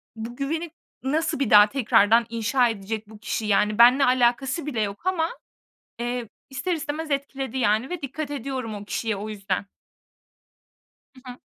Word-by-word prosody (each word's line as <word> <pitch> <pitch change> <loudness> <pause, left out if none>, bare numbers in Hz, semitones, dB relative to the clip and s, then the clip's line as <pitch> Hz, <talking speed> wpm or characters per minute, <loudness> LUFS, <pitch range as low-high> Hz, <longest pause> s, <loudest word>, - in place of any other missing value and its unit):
bu 230 +2 -7
güveni 315 +4 -3 0.3
nasıl 300 +2 0
bir 275 - 0
daha 210 0 +8
tekrardan 230 -2 +4
inşa 235 +2 +2
edecek 215 0 -5
bu 220 - -13
kişi?" 220 0 -3
Yani, 210 0 +2
benimle 250 +4 +7
alakası 255 +4 +2
bile 255 -7 -2
yok 205 - -4
ama, 345 -3 +1 0.7
eee, 240 -1 -3 0.2
ister 315 +7 -2
istemez 315 -1 -4
etkiledi, 270 -2 -3
yani, 220 0 +1
ve 360 -2 -5
dikkat 285 +2 -5
ediyorum 260 -5 -4
o 205 0 -8
kişiye 225 0 -2
o 210 +2 -5
yüzden. 200 -2 -3 1.5
Hı 255 -1 -11
hı. - - -17
245 Hz, 155 wpm, -24 LUFS, 220-275 Hz, 1.5 s, daha